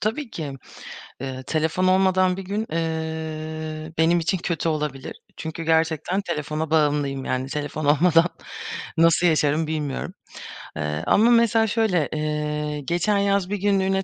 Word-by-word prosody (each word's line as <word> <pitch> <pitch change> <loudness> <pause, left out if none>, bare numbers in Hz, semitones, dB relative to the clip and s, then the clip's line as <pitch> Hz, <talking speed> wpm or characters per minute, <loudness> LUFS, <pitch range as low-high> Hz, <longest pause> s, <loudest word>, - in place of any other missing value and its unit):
Tabii 225 +4 -2
ki. 150 -4 -5 0.7
Eee, 130 -1 -5
telefon 160 +5 0
olmadan 185 0 +3
bir - - -4
gün, 205 +4 -2
eee, 160 -1 -4
benim 170 +2 +4
için 170 +3 0
kötü 170 -1 -1
olabilir. 150 -4 -3 0.2
Çünkü 160 +1 -5
gerçekten 160 +3 +1
telefona 155 -3 -3
bağımlıyım 145 -3 +1
yani 130 +1 -1
telefon 150 +1 -3
olmadan 165 +3 +4 0.7
nasıl 165 +2 +5
yaşarım 155 -1 +2
bilmiyorum. 150 -3 -3 0.6
Eee, 75 +2 -2
ama 225 +4 +5
mesela 230 -1 +4
şöyle, 205 -8 +1
eee, 150 -1 -2
geçen 175 +8 +1
yaz 200 -2 +1
1 205 - -1
günlüğüne 195 -1 +1
160 Hz, 135 wpm, -23 LUFS, 150-185 Hz, 0.7 s, nasıl